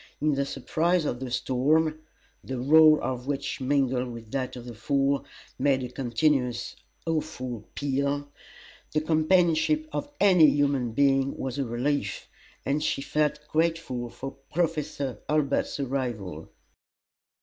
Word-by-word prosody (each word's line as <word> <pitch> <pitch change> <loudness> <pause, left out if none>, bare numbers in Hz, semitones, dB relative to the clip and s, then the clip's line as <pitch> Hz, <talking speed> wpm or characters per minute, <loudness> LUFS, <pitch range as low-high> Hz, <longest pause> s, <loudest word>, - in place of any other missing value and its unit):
In 150 0 +2
the 140 0 0
surprise 165 +6 0
of 120 - -2
the 130 -1 -5
storm 145 +6 +1 0.4
the 130 - -4
roar 155 +3 +7
of 125 0 -3
which, 140 -1 -3
mingled 130 -2 +1
with 115 -2 -10
that 130 -2 -2
of 120 -1 -8
the 120 - -7
Fall, 140 +5 +1 0.4
made 135 -1 +2
a 125 - -4
continuous 125 0 0 0.3
awful 130 -8 -3
peal 140 +1 -1 0.7
the 155 - +2
companionship 170 - +2
of 290 - -3
any 180 -6 +7
human 140 -5 +1
being 135 +1 +2
was 130 +1 -4
a 140 - 0
relief, 120 -2 -2 0.4
and 145 +2 0
she 135 - -1
felt 150 0 -1
grateful 160 -7 -1
for 135 +3 -7 0.2
Professor 155 -5 -1
Hurlbut's 150 -1 +1
arrival. 120 - -3
140 Hz, 130 wpm, -27 LUFS, 125-155 Hz, 0.7 s, roar